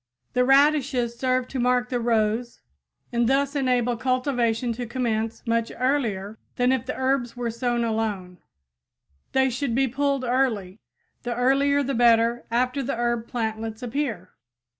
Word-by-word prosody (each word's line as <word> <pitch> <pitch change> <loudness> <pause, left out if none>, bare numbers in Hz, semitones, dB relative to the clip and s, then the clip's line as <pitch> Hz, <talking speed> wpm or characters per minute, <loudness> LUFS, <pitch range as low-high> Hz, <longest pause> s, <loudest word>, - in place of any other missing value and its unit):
The 250 - +3
radishes 270 -3 +3
serve 255 -1 +1
to 265 - -4
mark 250 0 +1
the 245 - -1
rows 230 0 0 0.5
and 235 0 +2
thus 280 +1 +1
enable 250 -3 +1
cultivation 245 -2 0
to 240 +1 -5
commence 225 -2 -2
much 230 0 0
earlier 225 -6 -1 0.2
than 250 +1 +2
if 260 -2 -1
the - - -3
herbs 260 -2 0
were 240 -1 -2
sown 240 0 -1
alone. 210 -5 -2 0.9
They 265 0 +3
should 245 -1 -2
be 270 +1 +2
pulled 275 +1 0
early 235 -6 0 0.4
the 240 -1 -3
earlier 275 +3 +2
the 275 +1 -2
better 235 0 +3
after 250 +4 0
the 270 -1 -2
herb 235 -1 -1
plantlets 220 0 -4
appear. 235 -8 -3
245 Hz, 145 wpm, -24 LUFS, 230-260 Hz, 0.9 s, The